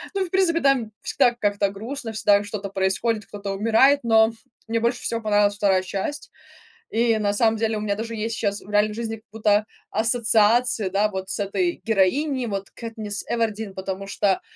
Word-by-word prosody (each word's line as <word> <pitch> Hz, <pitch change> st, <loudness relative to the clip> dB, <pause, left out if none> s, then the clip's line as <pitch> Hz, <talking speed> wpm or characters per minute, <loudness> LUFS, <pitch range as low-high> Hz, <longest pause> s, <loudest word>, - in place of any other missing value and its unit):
ну 390 Hz, -, +1 dB
и, 370 Hz, -, -4 dB
в -, -, -18 dB
принципе, 365 Hz, -3 st, +2 dB
там 265 Hz, -6 st, +2 dB
всегда 240 Hz, -1 st, +2 dB
как-то 205 Hz, -3 st, 0 dB
грустно, 225 Hz, +4 st, -6 dB
всегда 205 Hz, -1 st, +3 dB
что-то 205 Hz, -1 st, -5 dB
происходит, 195 Hz, +3 st, -1 dB
кто-то 205 Hz, -1 st, -6 dB
умирает, 230 Hz, +8 st, +4 dB
но 225 Hz, -1 st, +4 dB, 0.4 s
мне 230 Hz, 0 st, 0 dB
больше 235 Hz, +2 st, -1 dB
всего 230 Hz, 0 st, -1 dB
понравилась 205 Hz, -1 st, +2 dB
2 195 Hz, -2 st, +2 dB
часть, 195 Hz, +10 st, -4 dB, 0.6 s
и 230 Hz, 0 st, +2 dB
на 205 Hz, -1 st, 0 dB
самом 225 Hz, +1 st, +2 dB
деле 220 Hz, 0 st, 0 dB
у -, -, -4 dB
меня 205 Hz, -1 st, -1 dB
даже 230 Hz, +2 st, -5 dB
есть 225 Hz, +1 st, -3 dB
щас 200 Hz, +1 st, -1 dB
в -, -, -15 dB
реальной 210 Hz, +1 st, +2 dB
жизни 225 Hz, 0 st, -4 dB
как 220 Hz, 0 st, -18 dB
будто 215 Hz, -1 st, +2 dB, 0.2 s
ассоциации, 230 Hz, -1 st, +2 dB
да, 205 Hz, +3 st, +1 dB
вот 190 Hz, -1 st, -5 dB
с -, -, -3 dB
этой 345 Hz, -, -1 dB
героиней, 245 Hz, +6 st, +1 dB
вот 195 Hz, -2 st, -4 dB
Кэтнис 220 Hz, -3 st, -6 dB
Эвердин, 220 Hz, -3 st, -2 dB
потому 190 Hz, +1 st, -5 dB
что, 195 Hz, -1 st, 0 dB
220 Hz, 185 wpm, -23 LUFS, 205-230 Hz, 0.6 s, умирает